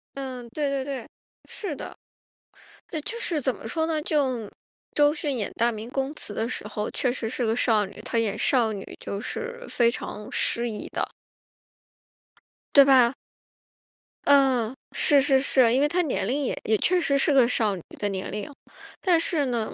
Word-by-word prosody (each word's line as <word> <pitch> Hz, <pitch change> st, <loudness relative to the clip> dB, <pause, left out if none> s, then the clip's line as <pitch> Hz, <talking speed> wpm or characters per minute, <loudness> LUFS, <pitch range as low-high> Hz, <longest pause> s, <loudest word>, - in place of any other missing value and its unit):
嗯， 255 Hz, -3 st, -6 dB
对 285 Hz, +3 st, -1 dB
对 275 Hz, -1 st, -1 dB
对， 270 Hz, -4 st, -5 dB, 0.4 s
是 375 Hz, -8 st, -4 dB
的。 -, -, -8 dB, 1.1 s
就 465 Hz, -, -3 dB
是 325 Hz, -9 st, 0 dB
怎 260 Hz, -1 st, 0 dB
么 220 Hz, -, -9 dB
说 320 Hz, +7 st, 0 dB
呢， 315 Hz, -2 st, -1 dB
就 260 Hz, -8 st, 0 dB, 0.4 s
周 295 Hz, 0 st, +4 dB
迅 290 Hz, -3 st, -2 dB
演 210 Hz, -, -2 dB
《大 235 Hz, +1 st, +2 dB
明 220 Hz, +1 st, -7 dB
宫 270 Hz, +2 st, -2 dB
词》 210 Hz, -, -5 dB
的 225 Hz, -, -1 dB
时 210 Hz, -, -4 dB
候， 210 Hz, 0 st, -3 dB
确 250 Hz, -, 0 dB
实 230 Hz, -3 st, -3 dB
是 245 Hz, 0 st, -2 dB
个 225 Hz, -, +1 dB
少 220 Hz, -4 st, +3 dB
女， 200 Hz, -, -11 dB
她 235 Hz, +1 st, -3 dB
演 220 Hz, -3 st, 0 dB
少 230 Hz, -5 st, +2 dB
女 195 Hz, -, -6 dB
就 200 Hz, +1 st, -5 dB
是 480 Hz, -, -5 dB
非 235 Hz, -2 st, +3 dB
常 210 Hz, -3 st, -6 dB
适 235 Hz, 0 st, 0 dB
宜 210 Hz, -, -6 dB
的。 -, -, -2 dB, 1.7 s
对 280 Hz, -, +10 dB
吧？ 255 Hz, -3 st, +6 dB, 1.1 s
嗯， 265 Hz, -4 st, +4 dB, 0.2 s
是 290 Hz, -2 st, +5 dB
是 270 Hz, -1 st, +4 dB
是。 255 Hz, -3 st, +4 dB
因 265 Hz, -, +3 dB
为 295 Hz, -, +4 dB
她 355 Hz, +4 st, +1 dB
年 270 Hz, -, -1 dB
龄 280 Hz, +5 st, 0 dB
也 -, -, -2 dB
也 220 Hz, 0 st, +2 dB
确 360 Hz, -, +2 dB
实 280 Hz, -4 st, +1 dB
是 280 Hz, +1 st, +2 dB
个 255 Hz, -3 st, +6 dB
少 215 Hz, -5 st, +1 dB
女 180 Hz, -, -8 dB, 0.2 s
的 205 Hz, -, 0 dB
年 190 Hz, -1 st, -4 dB
龄。 210 Hz, +3 st, -5 dB, 0.5 s
但 350 Hz, -4 st, +4 dB
是 310 Hz, -5 st, 0 dB
呢 235 Hz, -3 st, -2 dB
255 Hz, 200 characters per minute, -25 LUFS, 225-290 Hz, 1.7 s, 对